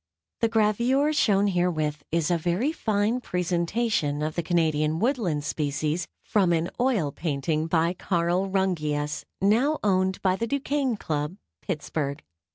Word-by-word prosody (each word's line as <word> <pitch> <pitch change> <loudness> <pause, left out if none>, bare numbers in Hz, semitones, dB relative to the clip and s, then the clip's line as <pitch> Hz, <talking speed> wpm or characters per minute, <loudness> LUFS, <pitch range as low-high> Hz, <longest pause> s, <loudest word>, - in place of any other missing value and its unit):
The 230 - +2
gravure 235 +7 +2
shown 205 -9 +3
herewith 170 -6 0
is 165 0 +1
a 175 - +3
very 180 - 0
fine 220 -4 0
presentation 175 -4 0
of 155 0 -2
the 170 - -1
Canadian 160 -2 +1
Woodland 210 - 0
species 150 +3 -1 0.2
from 195 -5 +2
an 165 +1 0
oil 230 - +1
painting 155 +1 -1
by 165 +1 +2
Carl 180 +1 0
Rungius, 150 -6 -1 0.2
now 245 +10 +3
owned 190 -2 +2
by 185 -1 +2
the 230 - -2
Duquesne 280 -2 0
Club, 150 +1 -3 0.2
Pittsburgh. 150 -4 -3
180 Hz, 135 wpm, -26 LUFS, 155-215 Hz, 0.2 s, shown